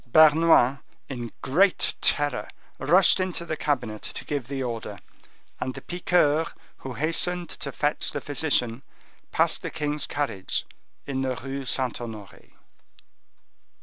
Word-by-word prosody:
Bernouin, 155 -3 +6 0.3
in 120 -4 -5
great 180 +8 +3
terror, 145 0 +2 0.3
rushed 180 +6 +5
into 185 -2 -2
the 155 - -2
cabinet 125 -8 -2
to - - -6
give 140 -5 -3
the 135 -1 -3
order, 115 -4 -5 0.6
and 130 0 -3
the - - -7
piqueur, 175 -3 +2 0.3
who 130 - -7
hastened 170 +3 +1
to 140 - -4
fetch 150 +2 -1
the - - -3
physician, 135 -5 +1 0.5
passed - - +2
the - - -4
king's 150 0 -1
carriage 105 -10 -2 0.4
in 135 -1 -2
the 130 -1 -1
Rue 135 +2 -5
Saint 130 -1 -1
Honore. 110 -4 -9
140 Hz, 130 wpm, -26 LUFS, 125-160 Hz, 0.6 s, Bernouin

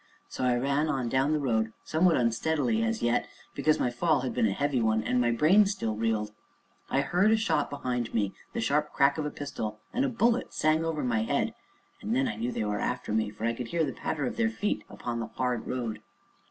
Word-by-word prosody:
So - - -5
I 125 -1 +3
ran 140 +4 +1
on 130 -5 -1
down 135 +4 +2
the 155 - +2
road, 110 -6 0
somewhat 165 +1 +3
unsteadily 120 0 +1
as 110 0 -1
yet, 120 +1 +1 0.3
because 155 +2 +2
my 125 - +1
fall 155 +2 +2
had 130 - -3
been 110 - +2
a - - 0
heavy 140 +3 0
one, 110 -1 +2
and 125 +3 +1
my 120 - +2
brain 165 - +5
still 195 - -2
reeled. 110 -1 -1 0.6
I 135 - +2
heard 180 +8 +2
a 220 - +4
shout 180 -9 +1
behind 125 -4 -3
me 100 -4 0 0.2
the - - -2
sharp 150 +6 +1
crack 140 +2 +3
of 150 - -1
a - - -2
pistol, 110 -8 -5
and 260 - +1
a 275 - +1
bullet 235 0 +1
sang 155 +1 +2
over 160 -3 -2
my 115 -3 +1
head; 110 - 0 0.5
and 110 +3 -1
then 130 +1 +2
I 110 - -3
knew 115 +3 -2
they 110 - -2
were 105 -1 -1
after - - -2
me, 110 -1 +1
for 105 +2 -6
I 115 - +1
could 120 0 -5
hear 170 +5 0
the 135 - -4
patter 145 +2 -2
of - - -4
their 230 -1 +2
feet 210 -2 -2
upon 120 -1 -4
the 115 - -3
hard 125 -2 -2
road. 115 -4 -3
125 Hz, 235 wpm, -28 LUFS, 115-155 Hz, 0.6 s, brain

